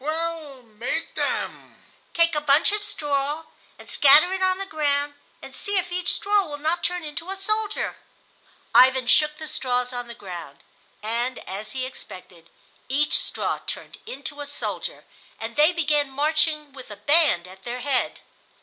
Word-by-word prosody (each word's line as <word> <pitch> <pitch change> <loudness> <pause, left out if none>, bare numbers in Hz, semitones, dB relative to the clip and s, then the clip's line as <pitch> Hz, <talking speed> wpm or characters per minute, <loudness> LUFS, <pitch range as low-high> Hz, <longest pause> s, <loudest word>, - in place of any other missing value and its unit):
"Well, 310 -3 -3
make 230 +8 -4
them." - - -3 0.4
"Take 335 0 +5
a 300 - 0
bunch 295 +5 +5
of 420 0 -1
straw 295 -5 -2 0.3
and - - -14
scatter 300 +6 +6
it 380 - -2
on 370 0 +3
the 390 - -4
ground, 290 -4 0 0.3
and - - -9
see 405 -1 -1
if 365 -1 0
each 360 0 +1
straw 410 0 +2
will 290 -1 -6
not 320 +4 +1
turn 360 -1 0
into 315 +4 -5
a 385 - -3
soldier." 425 +2 -1 0.8
Ivan 255 +2 +6
shook 300 +4 +3
the 315 - -7
straws 250 -3 -1
on 245 -1 -4
the 235 - -8
ground, 170 -9 -9 0.4
and, 235 +3 -1
as 205 +3 -5
he 260 -1 -2
expected, 185 -9 -11 0.4
each 290 +3 +3
straw - - -2
turned - - -6
into 295 -11 -6
a 290 - -5
soldier, 285 - -5 0.3
and 225 +1 -5
they 300 +3 +5
began 300 -4 +1
marching 300 +1 0
with 260 -4 -11
a 210 - -7
band 290 - +4
at 190 +1 -14
their 245 +1 -5
head. 260 -1 0
290 Hz, 165 wpm, -24 LUFS, 250-330 Hz, 0.8 s, scatter